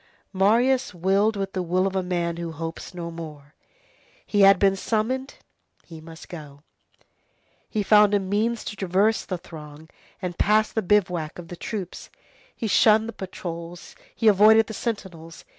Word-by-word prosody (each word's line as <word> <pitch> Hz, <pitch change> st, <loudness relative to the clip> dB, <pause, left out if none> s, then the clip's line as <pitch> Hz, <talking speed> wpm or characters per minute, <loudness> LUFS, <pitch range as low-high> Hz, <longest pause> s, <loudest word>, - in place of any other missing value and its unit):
Marius 230 Hz, +5 st, +2 dB
willed 195 Hz, +5 st, +2 dB
with 195 Hz, -1 st, -4 dB
the 185 Hz, -, -2 dB
will 180 Hz, +2 st, 0 dB
of 195 Hz, 0 st, -2 dB
a 190 Hz, -, +1 dB
man 175 Hz, -2 st, -2 dB
who 170 Hz, -1 st, -5 dB
hopes 165 Hz, +3 st, -7 dB
no 170 Hz, -1 st, -5 dB
more. 150 Hz, -3 st, -10 dB, 0.7 s
He 205 Hz, -, +1 dB
had 195 Hz, 0 st, +7 dB
been 195 Hz, 0 st, +3 dB
summoned, 235 Hz, +7 st, -2 dB, 0.5 s
he 160 Hz, -2 st, -11 dB
must 160 Hz, 0 st, -12 dB
go. 145 Hz, -4 st, -11 dB, 1.1 s
He 215 Hz, -, -1 dB
found 210 Hz, 0 st, +5 dB
a -, -, +3 dB
means 210 Hz, +4 st, -1 dB
to 210 Hz, -, -6 dB
traverse 195 Hz, +3 st, +1 dB
the 185 Hz, -, -3 dB
throng 155 Hz, -2 st, -12 dB, 0.3 s
and 180 Hz, -2 st, -4 dB
to -, -, -31 dB
pass 215 Hz, +1 st, +3 dB
the 220 Hz, -, -1 dB
bivouac 180 Hz, -5 st, 0 dB
of 170 Hz, -2 st, -10 dB
the 175 Hz, -, -7 dB
troops, 190 Hz, 0 st, -6 dB, 0.5 s
he -, -, -5 dB
shunned 220 Hz, +1 st, +4 dB
the 230 Hz, -, -6 dB
patrols, 175 Hz, -2 st, -8 dB, 0.2 s
he 225 Hz, -, 0 dB
avoided 215 Hz, +2 st, +6 dB
the 220 Hz, -, -8 dB
sentinels. 185 Hz, -8 st, -6 dB
190 Hz, 165 wpm, -24 LUFS, 170-210 Hz, 1.1 s, had